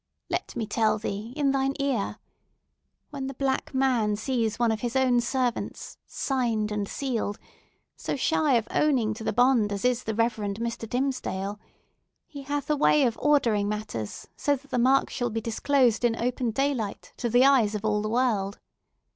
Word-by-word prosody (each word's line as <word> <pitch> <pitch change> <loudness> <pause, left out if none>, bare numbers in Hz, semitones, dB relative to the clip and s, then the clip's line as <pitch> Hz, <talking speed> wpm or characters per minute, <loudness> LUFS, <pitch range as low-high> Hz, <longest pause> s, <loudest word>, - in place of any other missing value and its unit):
Let - - -3
me 225 - -2
tell 215 0 +1
thee 210 +1 -5
in 285 -2 +2
thine 270 0 0
ear! 270 -7 -1 0.9
When 275 -2 -4
the 270 - -6
Black 265 0 -1
Man 250 -6 +2
sees 225 -1 -1
one 235 -1 +2
of 220 - -1
his 240 +1 -3
own 255 -2 +3
servants, 245 0 -2
signed 230 -6 -1
and 205 -1 -2
sealed, 235 -7 -2 0.6
so - - -3
shy 300 +1 +2
of 230 -1 +1
owning 255 -8 +2
to 220 - -8
the - - 0
bond 245 -4 +3
as 200 +3 -3
is 250 -1 +2
the 220 - -2
Reverend 220 -3 0
Mr. 230 -1 -4
Dimmesdale, 210 -6 -2 0.7
he 285 -2 -9
hath 285 +1 -3
a - - +3
way 295 0 +4
of 235 -3 0
ordering 230 -9 +2
matters 210 - -5
so 285 - +1
that 280 +1 -15
the 250 - +1
mark 260 +3 +3
shall 245 -1 -1
be 225 0 -2
disclosed, 235 +1 +1
in 235 -1 +3
open 245 +1 -1
daylight, 245 -3 -2
to 240 - -2
the 245 +3 +5
eyes 240 -7 +4
of 210 +1 -4
all 210 -1 +1
the 215 - -2
world! 215 -5 0
240 Hz, 180 wpm, -26 LUFS, 215-270 Hz, 0.9 s, the